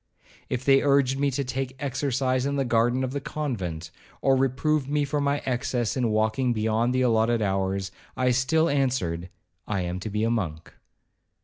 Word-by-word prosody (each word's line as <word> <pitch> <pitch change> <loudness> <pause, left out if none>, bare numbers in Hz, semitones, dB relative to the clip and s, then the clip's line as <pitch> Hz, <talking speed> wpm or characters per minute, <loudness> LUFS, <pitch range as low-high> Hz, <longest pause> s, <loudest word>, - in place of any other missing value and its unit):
If 125 +1 -3
they 135 -1 +5
urged 140 -2 +2
me 140 0 +2
to 140 +1 -1
take 130 0 -4
exercise 130 -1 0
in 140 - -1
the 135 -1 0
garden 120 +2 +2
of 130 - -2
the 140 +1 -3
convent, 95 - -4 0.3
or 135 -1 +3
reproved 135 +2 +1
me 145 0 +1
for 145 +1 -1
my 140 0 0
excess 125 -2 -1
in 125 -3 +1
walking 110 +4 +1
beyond 110 +2 +1
the 130 - +2
allotted 115 -1 +2
hours, 95 -1 -1 0.3
I 125 -1 +2
still 135 +6 +2
answered, 125 - 0 0.4
'I 100 -3 -1
am 90 +1 -3
to 100 - -5
be 105 +1 -1
a 115 - +1
monk.' 85 -8 -3
125 Hz, 180 wpm, -26 LUFS, 110-135 Hz, 0.4 s, they